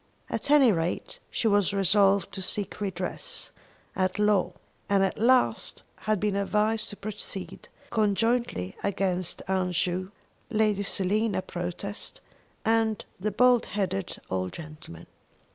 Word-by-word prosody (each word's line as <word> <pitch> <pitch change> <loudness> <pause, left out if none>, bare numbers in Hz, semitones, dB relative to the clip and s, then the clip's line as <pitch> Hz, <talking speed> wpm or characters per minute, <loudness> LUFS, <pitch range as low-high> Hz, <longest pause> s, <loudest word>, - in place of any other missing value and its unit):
At - - -2
any 285 -5 +7
rate, 170 -2 -2
she 230 - 0
was 205 -2 +3
resolved 195 0 +4
to 190 - -4
seek 200 +2 -2
redress 185 -3 -1 0.4
at 185 -1 0
law, 210 -1 +2 0.4
and 200 -1 +4
at 195 - -1
last 250 +3 +2
had 215 -2 -1
been 205 0 0
advised 210 +2 +1
to 205 - -7
proceed 200 -2 -7 0.2
conjointly 215 - +1
against 185 -3 -1
Aunt 185 -1 0
Ju, 185 +2 0 0.4
Lady 215 -3 +2
Selina 200 +1 0
Protest, 180 +3 -4 0.5
and 225 -1 +2
the 210 +3 0
bald 245 +3 +4
headed 195 -2 -2
old 95 -1 -1
gentleman. 155 - -10
200 Hz, 125 wpm, -27 LUFS, 185-215 Hz, 0.5 s, any